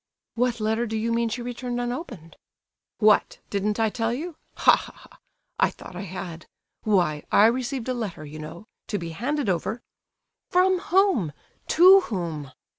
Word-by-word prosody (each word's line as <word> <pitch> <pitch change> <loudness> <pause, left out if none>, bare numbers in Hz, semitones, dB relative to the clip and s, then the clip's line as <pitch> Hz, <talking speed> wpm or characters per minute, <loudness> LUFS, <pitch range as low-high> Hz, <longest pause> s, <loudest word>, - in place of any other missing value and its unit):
"What 240 0 0
letter 220 +2 0
do 220 0 -2
you 230 +1 0
mean 230 0 +1
she 240 +2 -4
returned 245 0 -4
unopened?" 240 - -5 0.6
"What! 215 -2 +3
didn't 205 +2 -1
I 220 -1 +2
tell 225 0 -1
you? 315 +7 -4 0.2
Ha, - - +6
ha, - - -8
ha! - - -18 0.4
I - - +4
thought - - -12
I 180 - -5
had. 170 -3 -7 0.3
Why, 175 -8 +1
I 205 - +6
received 250 +1 0
a 255 - 0
letter, 205 -10 -5
you 150 +1 -9
know, 160 +6 -9 0.2
to 205 - -2
be 170 -3 -5
handed 270 - -2
over—" 190 +6 -1 0.7
"From 370 0 +3
whom? 350 - +2 0.3
To 370 +4 +8
whom?" 165 - -4
225 Hz, 165 wpm, -25 LUFS, 180-250 Hz, 0.7 s, To